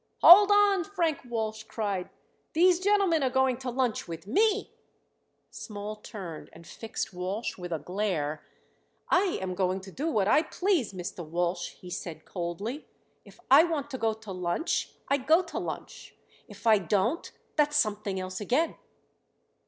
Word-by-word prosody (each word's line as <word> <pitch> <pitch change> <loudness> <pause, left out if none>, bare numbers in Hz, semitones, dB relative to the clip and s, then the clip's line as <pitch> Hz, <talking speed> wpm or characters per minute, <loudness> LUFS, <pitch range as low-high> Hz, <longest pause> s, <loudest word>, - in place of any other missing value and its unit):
"Hold 395 +3 +10
on!" 410 -2 +4
Frank 335 -5 -1
Walsh 220 -2 -2
cried. 205 -4 -3 0.4
"These 355 +2 +4
gentlemen 390 -4 +3
are 265 - +2
going 265 -1 +2
to 260 0 -5
lunch 245 -2 -1
with 165 0 -7
me." 415 - +1 0.8
Small 210 -1 -6
turned 190 -7 -8
and 165 +1 -14
fixed 225 +2 -5
Walsh 185 +6 -3
with 175 -1 -8
a 165 - 0
glare. 160 -3 -2 0.7
"I 370 0 +3
am 185 -1 -3
going 185 +1 0
to 190 0 -11
do 290 - -3
what 205 -10 +1
I 295 - +5
please, 340 - 0
Mr. 180 -1 -6
Walsh," 175 +2 -2
he 180 - -12
said 160 -2 -6
coldly. 195 - -5 0.4
"If - - -17
I 285 +4 +9
want 300 -4 -2
to 260 - -5
go 225 -1 +1
to 220 -2 -10
lunch 180 - -1 0.2
I 280 - +2
go 315 +7 +3
to 345 - -5
lunch; - - -7 0.3
if - - -14
I 220 -2 +6
don't 205 - 0 0.2
that's 295 -1 +2
something 210 -6 0
else 185 +1 -5
again." 265 +10 0
220 Hz, 160 wpm, -28 LUFS, 185-310 Hz, 0.8 s, Hold